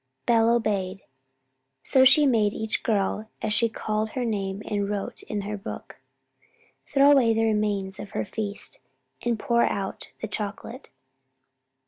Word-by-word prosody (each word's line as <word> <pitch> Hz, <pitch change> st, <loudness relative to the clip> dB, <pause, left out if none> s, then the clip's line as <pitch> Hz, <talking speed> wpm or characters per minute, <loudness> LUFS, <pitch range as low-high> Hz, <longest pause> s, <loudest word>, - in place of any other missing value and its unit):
Belle 230 Hz, -1 st, +4 dB
obeyed. 200 Hz, -5 st, 0 dB, 0.8 s
So 260 Hz, -1 st, +5 dB
she 295 Hz, +3 st, +7 dB
made 220 Hz, -6 st, +2 dB
each 220 Hz, -1 st, -2 dB
girl, 215 Hz, 0 st, -1 dB
as 215 Hz, -1 st, +1 dB
she 230 Hz, +2 st, +3 dB
called 215 Hz, 0 st, -2 dB
her 255 Hz, -2 st, -1 dB
name 200 Hz, -2 st, -2 dB
and 205 Hz, -1 st, -1 dB
wrote 205 Hz, -1 st, -4 dB
it -, -, -17 dB
in 210 Hz, -1 st, -2 dB
her 210 Hz, +1 st, -4 dB
book, 200 Hz, -, -8 dB, 0.9 s
throw 280 Hz, 0 st, +6 dB
away 240 Hz, -6 st, +5 dB
the 225 Hz, -, +2 dB
remains 210 Hz, -3 st, 0 dB
of 205 Hz, -, -7 dB
her -, -, -1 dB
feast, 210 Hz, -, -4 dB, 0.4 s
and 240 Hz, -1 st, 0 dB
pour 235 Hz, +2 st, +1 dB
out 195 Hz, -1 st, -3 dB
the 220 Hz, -, -4 dB
chocolate. 215 Hz, +4 st, -5 dB
215 Hz, 150 wpm, -26 LUFS, 205-230 Hz, 0.9 s, she